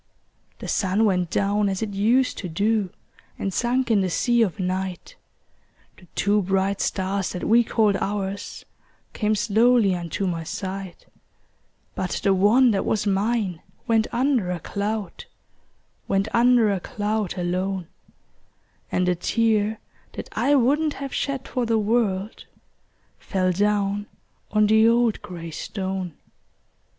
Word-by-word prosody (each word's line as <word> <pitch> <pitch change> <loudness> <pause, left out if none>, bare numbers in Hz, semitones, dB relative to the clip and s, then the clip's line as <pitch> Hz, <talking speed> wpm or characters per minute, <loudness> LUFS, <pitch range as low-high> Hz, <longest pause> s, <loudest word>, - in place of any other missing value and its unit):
The - - -8
sun 200 +3 +1
went 180 -4 +1
down 200 +2 +1
as 190 +2 -2
it 215 - -3
used 235 +6 +2
to 180 - -5
do, 205 +3 0 0.5
And 195 - -3
sunk 245 +3 0
in 210 -3 +4
the 185 - 0
sea 240 +7 +2
of 205 -3 0
night; 185 - -3 0.8
The 180 - -19
two 205 +1 +2
bright 195 +1 0
stars 190 0 -1
that 180 - -5
we 235 +2 +4
called 215 -3 +2
ours 200 0 -4 0.5
Came 215 0 0
slowly 215 0 +3
unto 175 +2 -3
my 170 -3 -2
sight; 190 +2 -6 0.9
But - - -3
the 195 - +4
one 225 +7 +5
that 195 -2 0
was 215 - 0
mine 200 -3 0 0.2
went 225 -2 +2
under 250 -6 +1
a 180 -1 -2
cloud— 205 +2 -4 0.8
Went 195 +1 +1
under 235 -2 +4
a 195 - -1
cloud, 210 0 -2
alone; 185 +1 -2 1.1
And 180 0 +1
a 180 - +3
tear 215 +3 +1 0.3
that - - -7
I 290 - +2
wouldn't 290 +4 +2
have 275 -1 -6
shed 275 -1 -2
for 250 -3 -2
the 225 -1 +2
world, 210 -2 0 0.7
Fell 185 -1 0
down 205 +1 0 0.4
on 215 0 +3
the 220 +1 +5
old 235 -1 +2
gray 175 -5 -8
stone. 190 -1 -4
205 Hz, 140 wpm, -24 LUFS, 190-225 Hz, 1.1 s, one